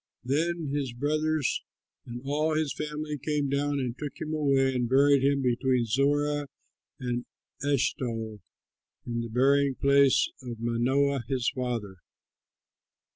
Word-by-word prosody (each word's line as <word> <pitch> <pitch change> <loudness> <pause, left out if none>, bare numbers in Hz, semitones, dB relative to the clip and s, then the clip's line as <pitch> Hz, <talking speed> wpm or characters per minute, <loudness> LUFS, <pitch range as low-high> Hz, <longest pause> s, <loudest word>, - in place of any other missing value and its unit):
Then 155 +3 -1
his 140 -4 -2
brothers 155 +2 0 0.5
and 120 0 -6
all 155 +3 0
his 155 -2 0
family 150 -1 -4
came 150 0 -1
down 140 +1 0
and 125 -3 -2
took 145 +1 -7
him 155 - -4
away 135 -3 +2
and 125 -2 -1
buried 140 +1 +5
him 140 0 +2
between 125 0 +1
Zorah 145 +4 +1 0.5
and 125 -2 -3 0.4
Eshtaol 120 -6 -1 0.7
in 120 -1 -2
the 115 - -5
burying 135 +3 +3
place 140 0 +4
of 120 -3 -7
Manoah 130 +4 +1
his 130 -2 0
father. 120 -7 -3
140 Hz, 130 wpm, -28 LUFS, 125-145 Hz, 0.7 s, buried